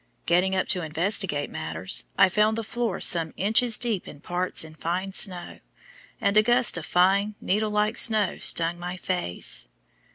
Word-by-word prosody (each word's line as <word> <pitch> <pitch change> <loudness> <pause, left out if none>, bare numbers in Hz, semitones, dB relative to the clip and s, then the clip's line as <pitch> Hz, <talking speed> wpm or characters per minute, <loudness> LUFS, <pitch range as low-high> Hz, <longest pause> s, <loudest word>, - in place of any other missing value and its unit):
Getting 185 +2 +1
up 185 - -1
to 180 - 0
investigate 165 -1 0
matters, 80 -2 -3
I - - +6
found 210 +3 +1
the 225 - -3
floor 220 -3 -3
some 165 -2 +3
inches 220 +3 +2
deep 225 -6 -2
in 145 - -11
parts 180 +3 -1
in 160 -1 -12
fine 180 +5 -4
snow, 185 -3 0 0.6
and 200 - 0
a 215 - +7
gust 240 +2 +3
of 175 -1 -6
fine, 195 +4 +2
needle 210 +3 -1
like 210 +1 -1
snow 215 -5 +2
stung 170 +1 +1
my 180 +1 -6
face. 85 - -3
185 Hz, 165 wpm, -24 LUFS, 170-215 Hz, 0.6 s, a